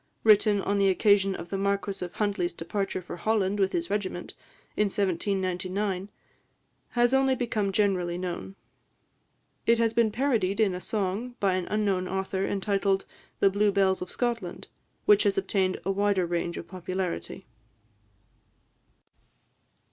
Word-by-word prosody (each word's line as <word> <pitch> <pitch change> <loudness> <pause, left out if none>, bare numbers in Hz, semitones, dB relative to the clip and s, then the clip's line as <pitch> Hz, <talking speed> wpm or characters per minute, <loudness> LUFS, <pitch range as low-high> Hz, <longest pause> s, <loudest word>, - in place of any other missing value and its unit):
written 210 -2 +5
on 200 0 0
the 195 -1 +4
occasion 195 0 +3
of 170 - -8
the 195 - -2
Marquis 200 -1 -1
of 175 - -6
Huntly's 195 -5 -1
departure 190 +2 -3
for 175 - -7
Holland 205 +1 0
with 190 -1 +2
his 170 +2 -2
regiment, 190 -4 -3 0.4
in 210 - +3
1799, 190 0 -1 0.8
has 240 +1 +3
only 265 0 +3
become 220 -5 -1
generally 185 -4 +1
known. 185 +1 -5 1.1
It 230 0 +5
has 230 -1 +2
been 230 -2 +3
parodied 225 -6 0
in 210 -4 +3
a 180 - -5
song, 215 +5 -2
by 195 -2 +2
an 185 -1 -2
unknown 200 -3 0
author, 190 0 -2
entitled 195 -1 0 0.4
"The 195 - +5
Blue 205 +1 +2
Bells 195 -1 +2
of 180 - -5
Scotland," 240 -2 -3 0.4
which 210 0 +6
has 200 -1 +2
obtained 190 -1 0
a 195 - +1
wider 200 -2 +1
range 170 0 -2
of 170 - -7
popularity. 185 +1 -4
195 Hz, 140 wpm, -27 LUFS, 185-210 Hz, 1.1 s, which